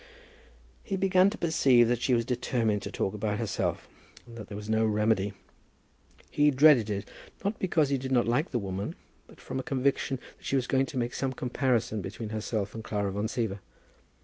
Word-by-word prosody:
He 195 - -3
began 190 0 +4
to 220 - -7
perceive 135 -8 +4
that 120 0 0
she 125 - +3
was 115 -1 0
determined 120 -4 0
to - - -6
talk 95 - -2
about 105 0 -2
herself, 110 -4 -2 0.4
and 120 -1 -13
that 110 -3 -8
there 105 - -7
was 105 0 -7
no 110 0 +2
remedy. 105 -2 +1 1.0
He 150 0 +4
dreaded 135 -5 +5
it, 100 -1 -3 0.4
not 205 +2 -1
because 160 -6 +2
he 140 -1 +1
did 130 +1 -5
not 120 -3 +3
like 130 +9 +1
the 125 - -1
woman, 100 -2 -4 0.3
but - - -17
from 130 - -5
a - - -1
conviction 135 -1 0 0.2
that - - -25
she - - 0
was 130 -2 +1
going 135 +1 +1
to - - -6
make 120 -1 -1
some 135 -1 -2
comparison 125 -4 0
between 110 +4 -6
herself 110 -1 -3
and 110 - -7
Clara 100 -2 -2
Van 105 +3 -2
Siever. 110 -3 -2
120 Hz, 200 wpm, -28 LUFS, 105-135 Hz, 1.0 s, dreaded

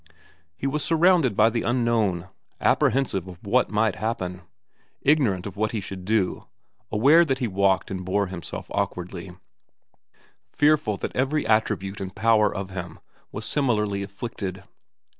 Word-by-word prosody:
He - - -5
was 145 +2 -1
surrounded 165 - +3
by 110 +2 +5
the 115 - -1
unknown, 115 -7 +1 0.3
apprehensive 110 -8 +1
of 90 -2 -9
what 120 +5 +2
might 105 0 +1
happen, 95 -5 -3 0.6
ignorant 125 -11 +2
of 100 0 -7
what 110 +1 0
he 110 - -1
should 95 -2 -8
do, 105 -2 0 0.4
aware 140 +10 +6
that 135 -5 0
he 125 -3 -1
walked 95 -1 +1
and 95 -1 -4
bore 100 +3 0
himself 90 -3 -7
awkwardly, 90 0 -4 1.1
fearful 145 -8 +2
that - - -5
every 135 +2 0
attribute 105 -3 0
and 95 -1 -6
power 110 -1 +3
of 95 -2 -5
him 90 -3 -6 0.3
was 105 +1 -6
similarly 105 -9 0
afflicted. 100 -2 -6
105 Hz, 140 wpm, -25 LUFS, 95-125 Hz, 1.1 s, aware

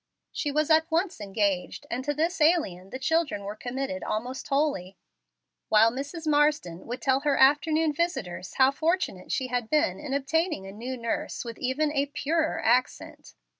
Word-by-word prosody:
She 290 - -2
was 305 +2 +1
at 320 +1 +4
once 335 - 0
engaged, 200 +4 -1
and 250 +2 -2
to 290 - 0
this 330 +3 -1
alien 250 - +2
the 260 - -5
children 290 -6 0
were 205 +1 -5
committed 270 +4 -4
almost 245 +5 -4
wholly, 275 -11 -1 0.7
while 220 +1 +6
Mrs. 285 +6 -6
Marsden 295 - +1
would 240 +1 -5
tell 265 0 +3
her 285 0 +1
afternoon 305 +3 +4
visitors 245 - -3
how 265 0 +5
fortunate 320 - -1
she 260 -1 -1
had 245 -2 -2
been 305 +1 +1
in 285 -2 -3
obtaining 310 - 0
a 195 - -8
new 245 +6 -6
nurse 230 +1 -3
with 230 -1 -7
even 280 +4 0
a 285 -1 0
"purer 315 +3 -1
accent." 250 +2 0
275 Hz, 170 wpm, -27 LUFS, 230-310 Hz, 0.7 s, while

